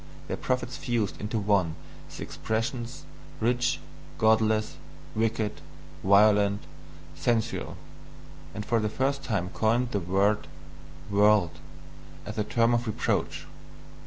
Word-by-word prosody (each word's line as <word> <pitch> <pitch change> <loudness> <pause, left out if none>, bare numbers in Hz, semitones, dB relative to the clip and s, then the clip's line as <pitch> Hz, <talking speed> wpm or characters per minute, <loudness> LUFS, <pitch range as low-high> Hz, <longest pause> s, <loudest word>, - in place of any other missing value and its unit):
Their - - -2
prophets 125 -1 -2
fused 105 -10 -1
into 105 +2 -2
one 100 -6 +2 0.4
the - - -5
expressions 120 +4 -3 0.3
"rich," 120 -7 +1 0.4
"godless," 110 -1 +3 0.4
"wicked," 110 -1 -1 0.4
"violent," 100 +1 +5 0.5
"sensual," 110 +9 -1 0.8
and 105 - -4
for 115 - +2
the 105 -1 0
first 135 +4 0
time 100 -8 -1
coined 120 +5 +1
the 100 - +1
word 100 +4 +1 0.6
"world" 100 -3 +4 0.7
as 105 - -6
a - - +2
term 115 +2 +2
of 120 0 0
reproach. 110 - -1
110 Hz, 110 wpm, -28 LUFS, 100-120 Hz, 0.8 s, violent